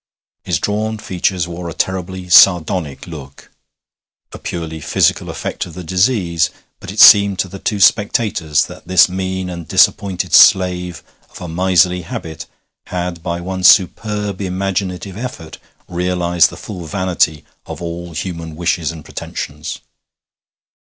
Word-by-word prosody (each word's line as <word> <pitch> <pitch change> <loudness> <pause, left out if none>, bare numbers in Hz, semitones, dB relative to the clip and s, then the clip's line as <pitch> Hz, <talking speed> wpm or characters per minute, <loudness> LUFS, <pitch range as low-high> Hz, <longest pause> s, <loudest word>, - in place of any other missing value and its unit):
His - - -1
drawn 110 +1 -2
features 90 -3 -2
wore 85 0 -6
a 80 - -8
terribly 95 +1 -3
sardonic 85 -5 +4
look 70 -6 -11 0.8
a - - -9
purely 80 -2 -5
physical - - +1
effect - - -5
of 85 - -12
the 90 - -7
disease; 90 -2 +1 0.3
but - - -10
it - - -6
seemed 100 -1 +8
to 95 - -1
the 95 +2 -10
two 105 +1 -2
spectators 95 -7 +2
that - - -13
this 90 -1 +5
mean 95 0 -4
and 85 -3 -7
disappointed 95 -4 +1
slave 90 -2 +4 0.3
of - - -13
a 90 - -7
miserly 90 +1 +2
habit 80 -1 -7 0.4
had 90 -1 -4
by 85 0 -3
one 95 +1 -5
superb 105 +2 +2
imaginative 95 0 -3
effort 110 -10 -7 0.3
realized 90 -1 +1
the - - -11
full 90 -6 -8
vanity 85 -4 0 0.2
of - - -7
all 85 0 -6
human 85 -1 -6
wishes 85 -1 -1
and 80 -3 -11
pretensions. - - -6
90 Hz, 135 wpm, -17 LUFS, 85-95 Hz, 0.8 s, seemed